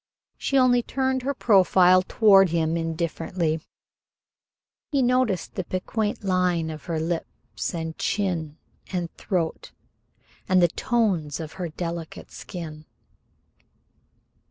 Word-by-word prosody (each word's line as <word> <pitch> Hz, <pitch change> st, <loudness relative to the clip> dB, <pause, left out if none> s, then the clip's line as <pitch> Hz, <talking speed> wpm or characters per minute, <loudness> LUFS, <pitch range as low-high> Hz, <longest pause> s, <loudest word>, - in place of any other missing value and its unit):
She 275 Hz, -, 0 dB
only 250 Hz, -2 st, +5 dB
turned 260 Hz, +1 st, -1 dB
her 275 Hz, +2 st, -2 dB
profile 185 Hz, -5 st, +5 dB
toward 195 Hz, -1 st, +5 dB
him 165 Hz, -1 st, 0 dB
indifferently. 165 Hz, 0 st, -2 dB, 1.3 s
He 275 Hz, -3 st, +2 dB
noticed 250 Hz, -6 st, +1 dB
the 185 Hz, -, -3 dB
piquant 205 Hz, +5 st, -2 dB
line 180 Hz, -4 st, +1 dB
of 155 Hz, -1 st, -9 dB
her 165 Hz, -3 st, -2 dB
lips 165 Hz, +2 st, -4 dB
and 160 Hz, -1 st, -4 dB
chin 165 Hz, -7 st, -1 dB, 0.3 s
and 175 Hz, -3 st, -3 dB
throat, 175 Hz, -5 st, -3 dB, 0.8 s
and 185 Hz, 0 st, +5 dB
the 175 Hz, -1 st, +5 dB
golden -, -, -20 dB
tones 195 Hz, -12 st, 0 dB
of 160 Hz, -2 st, -6 dB
her 180 Hz, -3 st, -4 dB
delicate 170 Hz, 0 st, -6 dB
skin. 155 Hz, -3 st, -8 dB
180 Hz, 115 wpm, -25 LUFS, 165-205 Hz, 1.3 s, only